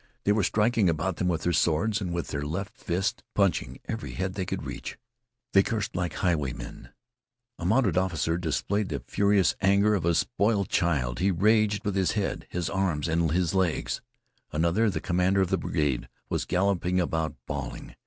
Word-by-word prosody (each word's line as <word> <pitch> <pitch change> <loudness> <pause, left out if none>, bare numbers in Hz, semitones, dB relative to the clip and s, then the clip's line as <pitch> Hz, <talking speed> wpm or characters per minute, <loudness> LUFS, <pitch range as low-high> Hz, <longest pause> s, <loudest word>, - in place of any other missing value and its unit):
They 100 - +3
were 105 +1 +3
striking 105 +1 +2
about 85 +3 -1
them 90 - 0
with 85 -3 0
their 90 - +1
swords 90 +7 +2
and 90 -3 -3
with 85 -1 -3
their 70 - -3
left 90 +7 -4
fists, 95 +7 -2
punching 100 -3 +1
every 115 0 -5
head 95 0 -2
they 95 -2 -3
could - - -3
reach. - - -6 0.6
They 100 - +7
cursed 105 -2 -2
like 90 -3 -1
highwaymen. 65 -8 -2 0.7
A 85 - -5
mounted 100 -3 +3
officer 85 -2 0
displayed 95 +5 -1
the 70 -4 -4
furious 100 -2 +2
anger 100 +2 +4
of 100 - 0
a 85 0 +2
spoiled 105 -2 +1
child. 70 -8 +1
He 95 +3 +3
raged 105 +3 +2
with 100 - 0
his 95 -2 +2
head, 105 -3 -2
his 90 -2 -2
arms, 90 -6 0
and 80 0 +1
his 90 0 +1
legs. 85 -10 0 0.5
Another, 85 +8 +2
the 95 - -3
commander 90 +2 +2
of 95 - +1
the - - +2
brigade, 70 -5 -1 0.2
was - - -1
galloping 90 -1 +1
about 80 -2 -1
bawling. - - -5
90 Hz, 180 wpm, -27 LUFS, 85-100 Hz, 0.7 s, They